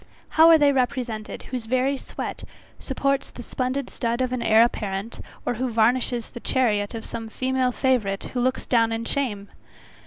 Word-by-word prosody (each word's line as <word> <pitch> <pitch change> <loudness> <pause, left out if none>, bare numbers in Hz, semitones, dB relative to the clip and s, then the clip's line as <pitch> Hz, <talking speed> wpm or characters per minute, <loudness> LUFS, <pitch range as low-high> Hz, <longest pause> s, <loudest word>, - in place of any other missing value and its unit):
How 325 +1 +6
are 325 - +8
they 290 -2 +4
represented, 245 -4 -2
whose 250 -3 -5
very 255 +3 +1
sweat - - -6 0.4
supports 275 0 -1
the 245 - -10
splendid 255 +3 -2
stud 235 0 -2
of 255 -1 0
an 250 - -2
heir 220 0 +6
apparent, 210 -2 -3 0.3
or - - 0
varnishes 240 0 +1
the - - -8
chariot 220 -5 0
of 225 - -6
some 225 -1 -6
female 260 +1 0
favourite 235 -7 0
who 250 - -1
looks 255 +1 0
down 230 -2 +3
on 225 0 -3
shame? 215 -9 -2
245 Hz, 165 wpm, -24 LUFS, 225-260 Hz, 0.4 s, are